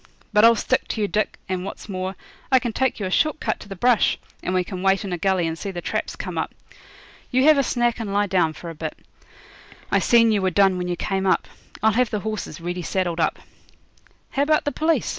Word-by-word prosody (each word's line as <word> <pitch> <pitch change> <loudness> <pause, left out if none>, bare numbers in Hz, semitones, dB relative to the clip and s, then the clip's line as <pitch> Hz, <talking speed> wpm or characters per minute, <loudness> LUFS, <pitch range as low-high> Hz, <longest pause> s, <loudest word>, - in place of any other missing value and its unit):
But 210 0 +5
I'll 230 0 +8
stick 255 +4 0
to 220 - -3
you, 205 - +2
Dick, 215 +1 -1
and, 185 -1 -2
what's 195 - -7
more, 185 -1 -4 0.4
I 260 - +7
can 240 -3 -1
take 265 0 0
you 200 - -2
a 185 - -3
short 310 +8 +2
cut - - -2
to 205 - -12
the 195 - -6
brush, 240 +4 +3 0.2
and - - -3
we 185 -1 +2
can 180 0 -6
wait 195 +2 +2
in 190 - -3
a - - -1
gully 190 -1 +1
and 160 0 -2
see 195 - -5
the 180 -2 -5
traps - - -3
come - - -4
up. - - -3 0.7
You 255 +1 +2
have 305 -1 +6
a - - +5
snack 240 -2 0
and 215 -3 -4
lie 205 +1 +2
down 180 -5 +1
for 170 +2 -8
a - - -8
bit. 155 0 -6 0.9
I - - +4
seen 230 -1 +5
you 210 -2 +2
were 190 - +2
done 190 0 +3
when 180 - -2
you 175 - -1
came 195 +1 -1
up. 185 - +2 0.4
I'll 220 - +5
have 245 +2 +2
the 210 - -2
horses 215 -8 -4
ready 175 +1 -4
saddled 175 -1 -1
up.' 160 - +1 0.9
'How 275 - 0
about 305 +2 +2
the 290 - 0
police? 315 +2 +1
195 Hz, 245 wpm, -23 LUFS, 180-230 Hz, 0.9 s, I'll